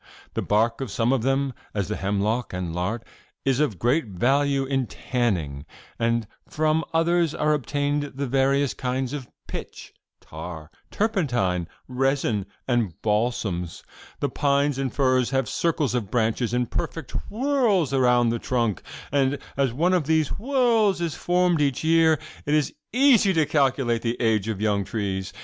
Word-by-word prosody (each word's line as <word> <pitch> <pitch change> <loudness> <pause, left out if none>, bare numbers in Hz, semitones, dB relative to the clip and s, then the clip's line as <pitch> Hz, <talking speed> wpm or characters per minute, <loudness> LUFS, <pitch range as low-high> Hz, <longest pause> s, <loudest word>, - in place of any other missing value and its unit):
The - - -1
bark 115 +4 +1
of 130 - -3
some 115 +5 +1
of 135 - +1
them, 135 +2 0 0.2
as 100 -3 -1
the 105 - -2
hemlock 105 +4 -1
and 90 -2 -3
larch, 95 +7 -2 0.4
is 135 -1 +2
of 145 -11 +1
great 125 - +1
value 135 +8 +1
in 135 -2 0
tanning, 90 - -2 0.4
and 115 0 +1 0.2
from 155 +1 +1
others 165 -1 +2
are 150 0 +2
obtained 145 +2 -1
the 140 +1 -2
various 135 +1 +2
kinds 130 +1 -2
of 135 -4 -6 0.2
pitch, - - -8 0.3
tar, 80 0 -9 0.2
turpentine, 120 - 0 0.2
resin 130 -6 0 0.2
and 120 -8 0
balsams,' 105 -6 -1 0.4
The - - 0
pines 140 -1 +1
and 135 -2 -1
firs 130 -3 +2
have 135 -1 0
circles 155 -6 0
of 115 -6 -2
branches 115 +1 0
in 125 +1 +1
imperfect 140 +4 -4 0.2
whorls 225 - +1
around 125 -2 +4
the 115 0 -1
trunk, 115 -7 -1 0.3
and, 140 0 +2 0.2
as 135 -3 +1
one 170 +9 +1
of 170 -6 +1
these 160 -2 +2
whorls 230 -6 +2
is 170 -3 -1
formed 175 -2 +1
each 140 -1 0
year, 160 0 +4 0.3
it 150 - +3
is 150 -2 +1 0.2
easy 245 -6 +5
to 160 -3 +3
calculate 130 -6 +1
the 115 0 -2
age 110 -3 +1
of 110 -3 -2
young 105 -2 +1
trees. 95 -3 -3
130 Hz, 155 wpm, -24 LUFS, 115-150 Hz, 0.4 s, easy